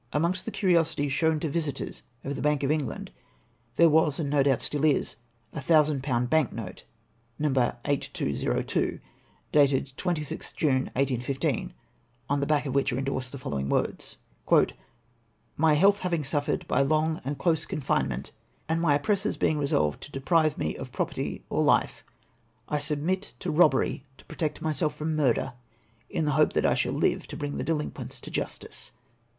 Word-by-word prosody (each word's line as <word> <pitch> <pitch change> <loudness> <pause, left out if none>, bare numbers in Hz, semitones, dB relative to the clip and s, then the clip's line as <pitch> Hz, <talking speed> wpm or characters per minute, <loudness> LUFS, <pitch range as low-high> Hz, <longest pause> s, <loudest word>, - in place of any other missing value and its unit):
Amongst 170 +5 0
the 225 - -3
curiosities 165 -8 +2
shown 160 +1 +2
to 160 - 0
visitors 155 -1 -3 0.2
of 140 - -3
the - - -5
Bank 150 -1 +1
of 140 - +2
England, 145 - -2 0.6
there 170 - +6
was, 155 -2 +3
and 145 -3 -1
no 145 -1 +4
doubt 135 -2 +3
is - - -2
still, 145 0 -1
a 120 -3 -3
thousand 150 -1 +3
pound 125 -3 0
bank 155 -1 +2
note, 110 -5 -7 0.5
No. 150 0 +1 0.4
8202, 140 - -1 0.5
dated 140 -2 +3
26th 165 -6 -3
June, 135 -4 +2
1815, 135 0 -1 0.6
on 145 - +2
the 140 - -1
back 150 -1 +2
of 135 - -2
which 140 -1 +2
are 120 - -2
endorsed 130 -1 -2
the 140 - -6
following 70 - -3
words: - - -1 0.4
— 115 -1 -7
" 115 -1 -40
My 155 0 +4
health 200 +6 +5
having 170 -5 -1
suffered 145 +1 -1
by 135 - +2
long 155 +3 +1
and 140 +2 -3
close 160 +1 +1
con - - -4
finement, 65 - -1 0.4
AND 165 +1 0
MY 150 -4 +4
OPPEESSOES 190 +8 0
BEING 150 -1 +1
EESOLVED 140 - +1
TO 145 - -10
DEPEIVE 155 +3 +2
ME 75 0 -2
OF - - -7
PEOPEETY - - -3
OR - - +1
LIFE, - - +2 0.6
I 150 - 0
SUBMIT 155 +6 -1
TO - - -2
EOBBEEY 150 -5 +3 0.2
TO - - -18
PEOTECT 155 -3 -3
myself 155 0 0
FEOM 155 +1 -2
MURDER, 130 -3 +1 0.6
IN 160 - -1
THE 150 - +1
HOPE 135 - +3
THAT - - +1
I - - +4
SHALL - - 0
LIVE - - 0
TO - - -7
BRING 145 -1 -3
THE - - -2
DELINQUENTS 155 -2 -3
TO - - -9
JUSTICE. - - -4
145 Hz, 175 wpm, -27 LUFS, 135-160 Hz, 0.6 s, there